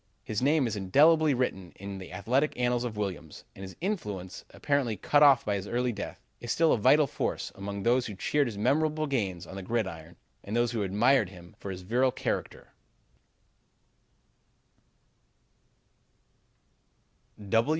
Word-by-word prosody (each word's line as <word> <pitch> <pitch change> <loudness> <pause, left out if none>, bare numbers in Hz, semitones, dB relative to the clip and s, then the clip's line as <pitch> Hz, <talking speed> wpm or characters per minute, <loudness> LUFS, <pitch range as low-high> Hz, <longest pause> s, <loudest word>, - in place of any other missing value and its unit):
"His 110 +1 -3
name 145 +1 +3
is 110 -3 -2
indelibly 145 - +4
written 95 -8 -2
in 100 0 -7
the 95 - -10
athletic 125 +10 0
annals 120 0 +1
of 115 -4 -5
Williams, 95 -7 -5
and - - -11
his 95 -1 -8
influence, 105 - -4
apparently 135 -7 -1
cut 145 +10 +2
off 140 -2 +6
by 105 - 0
his 100 0 -3
early 125 +2 0
death, 100 - -7
is 120 - -5
still 165 -1 +3
a - - +2
vital 150 +8 +5
force - - -3
among 100 0 -6
those 125 +2 +2
who 105 - -7
cheered 145 +9 +1
his 110 -4 -6
memorable 155 +7 +1
gains 100 - -2
on 95 - -10
the - - -5
gridiron 90 -6 -3 0.3
and 105 +4 -3
who 120 -2 0
admired 105 +3 +3
him 90 -2 -14
for 100 - -7
his 95 -1 -6
virile 125 +7 +2
character." - - -4
115 Hz, 150 wpm, -28 LUFS, 95-135 Hz, 0.3 s, off